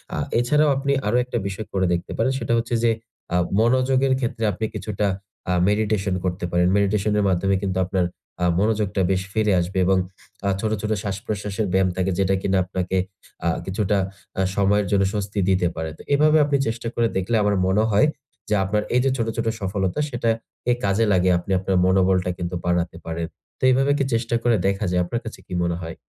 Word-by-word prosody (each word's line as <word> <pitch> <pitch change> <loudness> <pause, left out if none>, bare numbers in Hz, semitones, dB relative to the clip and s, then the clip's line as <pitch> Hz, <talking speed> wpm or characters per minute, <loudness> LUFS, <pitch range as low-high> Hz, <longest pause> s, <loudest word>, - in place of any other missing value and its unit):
আ - - -3 0.2
এছাড়াও 150 +5 +3
আপনি 140 +1 -1 0.2
আরো 115 +4 +2
একটা 125 -1 -3
বিষয় 100 +2 -5
করে 95 -1 +1
দেখতে 85 - -3
পারেন। 130 - +2
সেটা 115 -1 -1
হচ্ছে 115 +1 -1
যে 115 - +4 0.4
আ - - +4 0.2
মনোযোগের 130 +3 +3
ক্ষেত্রে 115 -3 -2
আপনি 105 +3 -3
কিছুটা 105 -1 -2 0.4
আ - - +2 0.2
মেডিটেশন 105 -2 0
করতে 90 0 -2
পারেন। 90 0 +3
মেডিটেশন 100 +1 +1
এর - - +2
মাধ্যমে 95 +2 +1
কিন্তু 95 -2 -2
আপনার 90 0 0 0.4
আ - - +4
মনোযোগটা 105 -2 +1
বেশ 95 -1 +1
ফিরে 110 -2 +2
আসবে 90 +3 -3
এবং 95 +1 +3 0.5
আ - - +3
ছোট, 110 +1 -1
ছোট 110 +1 -2
শ্বাসপ্রশ্বাসের 100 +1 -3
ব্যায়াম 95 0 +3
থাকে 95 +1 +1
যেটা 95 0 +2
কিনা 95 0 +1
আপনাকে 95 0 -2 0.5
আ - - +4 0.2
কিছুটা 100 +1 0 0.4
আ - - +3
সময়ের 100 0 +2
জন্য 100 -1 +3
স্বস্তি 105 -1 -2
দিতে 90 -2 +3
পারে। 80 -1 -3
তো - - -12
এভাবে 150 +2 +5
আপনি 145 -1 +2
চেষ্টা 115 +1 -3
করে 115 -1 +2
দেখলে 95 +5 0
আমার 105 0 +2
মনে 100 +3 +3
হয় 105 +9 +4 0.4
যে 105 - +3
আপনার 105 +2 0
এই 125 - +4
যে - - +4
ছোট, 115 -2 -1
ছোট 115 - -1
সফলতা 95 +4 -1
সেটাকে 115 -1 -2
কাজে 100 +3 +2
লাগিয়ে 90 -1 +3
আপনি 90 - -7
আপনার 95 0 -1
মনোবলটা 95 -1 +3
কিন্তু 90 +1 -3
বাড়াতে 85 -1 0
পারেন। 80 0 -3 0.3
তো - - -12
এইভাবে 135 +2 +3
কি 140 - +1
চেষ্টা 115 0 0
করে 120 -1 +4
দেখা 100 +1 0
যায়? 90 0 +2
আপনার 120 +7 -3
কাছে 115 - -7
কি - - -8
মনে 85 0 0
হয়? 80 -1 -6
100 Hz, 200 wpm, -23 LUFS, 95-115 Hz, 0.5 s, এভাবে